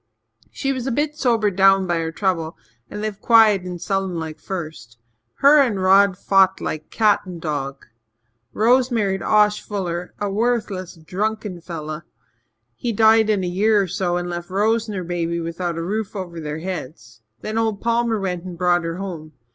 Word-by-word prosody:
She 275 0 -2
was 260 -1 -4
a - - 0
bit 295 +4 -1
sobered 230 -8 +1
down 195 0 +5
by 175 -2 0
her 160 0 -2
trouble 165 -3 -2 0.3
and 210 - -6
lived 215 -2 -4
quiet 220 -4 +5
and 180 -1 -6
sullen 195 -1 -2
like 160 -1 -5
at - - -32
first. 160 -11 -7 0.4
Her 290 +1 +7
and 230 -8 +1
Rod 190 0 +4
fought 190 -1 +3
like 155 0 -5
cat 215 -2 +3
and 175 -2 -7
dog. 140 -4 -4 0.7
Rose 245 +4 +3
married 200 -5 0
Osh 210 -1 +3
Fuller, 180 -4 -4
a 205 - -1
worthless, 205 -4 -1
drunken 195 +3 -4
fellow. 155 -2 -6 0.7
He 235 - -3
died 220 0 +4
in 205 -3 +1
a - - -1
year 205 +4 +2
or 195 - +1
so 175 0 -1
and 175 0 -3
left 175 0 -5
Rose 220 +4 +1
and 210 -2 -5
her 185 - -3
baby 170 -1 -2
without 170 +1 -3
a 165 - -3
roof 210 +4 -3
over 175 -4 -6
their 150 -1 -5
heads. 130 -11 -7 0.2
Then 215 +1 -2
old 220 -3 0
Palmer 230 -1 0
went 180 -3 -3
and 180 -2 -8
brought 175 0 +2
her 165 0 -3
home. 170 -5 -7
190 Hz, 185 wpm, -21 LUFS, 170-215 Hz, 0.7 s, Her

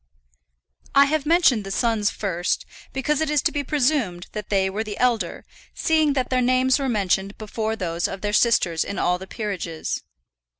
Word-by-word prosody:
I 280 0 +8
have 300 0 -1
mentioned 320 - +4
the 195 - -7
sons 215 0 +1
first, 180 -4 -2 0.3
because 290 +3 0
it 315 - 0
is 300 -3 +2
to - - +2
be 290 - -2
presumed 255 - 0
that 210 -2 -6
they 195 -2 +2
were 200 +3 -2
the 210 -2 -6
elder, 245 -3 0 0.3
seeing 315 -2 +2
that 260 -2 -1
their 255 0 +2
names 255 +2 +3
were 270 -1 -1
mentioned 195 -2 0
before 220 +1 -3
those 170 -4 -2
of 195 - -7
their 205 0 -2
sisters 195 -8 +3
in 200 - -5
all 180 0 +1
the 190 - -9
peerages. 185 -8 -4
220 Hz, 180 wpm, -23 LUFS, 195-270 Hz, 0.3 s, I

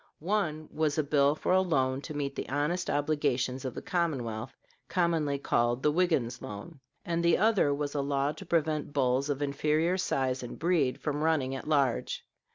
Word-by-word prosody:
One 155 -4 -1
was 155 -1 0
a 155 - +2
bill 145 0 +3
for - - -2
a 185 - +5
loan 135 -7 +1
to 155 - -5
meet 140 -1 -2
the - - -5
honest 150 +6 -1
obligations 140 -4 0
of 130 - -4
the - - -6
commonwealth, 130 - -2 0.3
commonly 165 -6 +1
called 120 -2 0
"the 150 - +4
Wiggins 150 -8 +1
loan"; 135 +10 -8 0.3
and 170 0 -1
the 170 -1 +4
other 210 -7 +3
was 145 0 -2
a 145 - 0
law 140 0 0
to 160 +6 -10
prevent 155 -3 0
bulls 135 0 +1
of 145 0 -1
inferior 155 +5 +1
size 130 -6 0
and 125 - -7
breed 160 -7 +1
from 150 -1 -2
running 150 -5 +1
at 135 - -6
large. 140 -5 0
145 Hz, 180 wpm, -29 LUFS, 135-160 Hz, 0.3 s, a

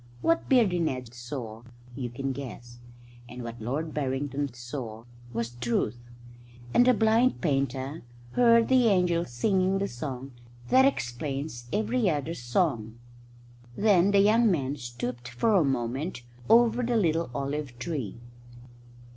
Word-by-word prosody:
What 330 0 +1
Beardy 225 -10 +4
Ned 125 -7 -2
saw 120 -2 -7 0.3
you 125 -2 -4
can 135 +3 -3
guess, 120 -3 -8 0.5
and 125 0 -8
what 115 0 -7
Lord 150 +8 -3
Barrington 140 0 -2
saw 120 -2 -7 0.3
was 115 0 -3
Truth; 120 0 -1 0.7
and 245 - +5
the 255 - +7
blind 225 +3 +3
painter 135 -1 -1 0.3
heard 230 - +5
the 255 -2 +4
angels 180 - +2
singing 185 - +1
the 200 +1 -1
song 130 +1 -6 0.4
that 260 +1 +6
explains 135 - -2
every 220 0 +1
other 150 0 -1
song. 120 - -1 0.8
Then 200 -3 +4
the 200 -1 +5
young 220 +3 +4
man 140 -6 0
stooped 120 -1 -6
for 125 - +1
a 190 -5 +5
moment 135 +2 -2 0.3
over 235 +1 +5
the 240 -1 +1
little 165 -6 +1
olive 140 -2 -3
tree. 120 - -4
140 Hz, 130 wpm, -27 LUFS, 120-195 Hz, 0.8 s, the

